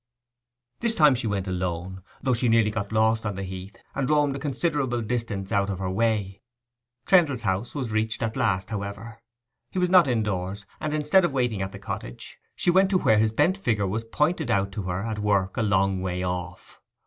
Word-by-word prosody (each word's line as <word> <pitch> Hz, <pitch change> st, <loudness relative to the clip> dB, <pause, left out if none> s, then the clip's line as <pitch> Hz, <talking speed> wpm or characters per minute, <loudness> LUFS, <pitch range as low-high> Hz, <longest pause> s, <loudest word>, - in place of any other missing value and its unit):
This 235 Hz, -1 st, 0 dB
time 150 Hz, -6 st, +6 dB
she 120 Hz, -2 st, -2 dB
went 100 Hz, -2 st, -2 dB
alone, 90 Hz, 0 st, -3 dB, 0.2 s
though 130 Hz, -, +2 dB
she 120 Hz, 0 st, +1 dB
nearly 115 Hz, -1 st, +4 dB
got 105 Hz, -2 st, -4 dB
lost 110 Hz, +1 st, +2 dB
on 105 Hz, -3 st, -3 dB
the 95 Hz, -, -4 dB
heath, 95 Hz, +1 st, -7 dB, 0.2 s
and 135 Hz, -1 st, -1 dB
roamed 145 Hz, -2 st, +2 dB
a -, -, -4 dB
considerable 140 Hz, -3 st, -1 dB
distance 110 Hz, -4 st, -3 dB
out 100 Hz, -2 st, +1 dB
of 95 Hz, -, -2 dB
her 95 Hz, 0 st, -3 dB
way. 100 Hz, -2 st, 0 dB, 0.6 s
Trendle's 155 Hz, -, +3 dB
house 95 Hz, +6 st, -1 dB
was 130 Hz, -6 st, -3 dB
reached 110 Hz, +1 st, -1 dB
at 115 Hz, 0 st, -2 dB
last, 95 Hz, -2 st, 0 dB
however: 105 Hz, +2 st, -6 dB, 0.5 s
he -, -, -7 dB
was 180 Hz, -1 st, +1 dB
not 180 Hz, -5 st, +7 dB
indoors, 100 Hz, -4 st, -2 dB
and 155 Hz, 0 st, -2 dB
instead 155 Hz, +5 st, +3 dB
of 170 Hz, -5 st, 0 dB
waiting 125 Hz, -6 st, 0 dB
at 95 Hz, 0 st, -3 dB
the -, -, -8 dB
cottage, -, -, -7 dB, 0.2 s
she 175 Hz, -, +2 dB
went 190 Hz, +2 st, +4 dB
to 190 Hz, -, +3 dB
where 110 Hz, -11 st, +3 dB
his 110 Hz, 0 st, +2 dB
bent 185 Hz, -, +2 dB
figure 110 Hz, -, 0 dB
was 110 Hz, +4 st, -2 dB
pointed 150 Hz, +5 st, 0 dB
out 100 Hz, -3 st, +1 dB
to 100 Hz, -, -4 dB
her 90 Hz, +2 st, -2 dB
at 110 Hz, -2 st, -3 dB
work 100 Hz, -2 st, +1 dB
a -, -, 0 dB
long 95 Hz, -2 st, +2 dB
way 90 Hz, -1 st, -2 dB
off. 90 Hz, 0 st, -5 dB
110 Hz, 205 wpm, -25 LUFS, 95-130 Hz, 0.6 s, not